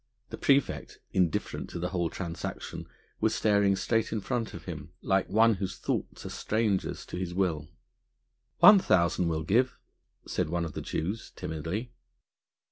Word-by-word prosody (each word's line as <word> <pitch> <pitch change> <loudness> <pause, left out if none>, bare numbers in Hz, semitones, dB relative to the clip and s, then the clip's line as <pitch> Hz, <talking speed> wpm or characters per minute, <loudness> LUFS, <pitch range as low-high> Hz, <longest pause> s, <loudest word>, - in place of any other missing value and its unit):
The - - -5
praefect, 140 -2 +1
indifferent 90 -4 0
to - - -5
the 90 +1 -2
whole 85 -3 0
transaction, 85 -2 -5 0.3
was - - +2
staring 100 -2 +3
straight 115 +3 0
in 110 - 0
front 115 +2 -2
of 85 - -9
him, 80 -1 -7
like 95 -1 +1
one 115 +2 +5
whose 95 -2 -4
thoughts - - -3
are - - -4
strangers 110 -3 -1
to - - -6
his 90 -1 -4
will. 80 -6 0 0.9
"One 210 -1 +9
thousand 85 - +2
we'll 80 -1 -1
give," 125 +10 +2 0.5
said - - -1
one 85 0 0
of 80 - -6
the - - -4
Jews 95 +8 -3
timidly. 85 +10 -4
95 Hz, 155 wpm, -29 LUFS, 85-110 Hz, 0.9 s, One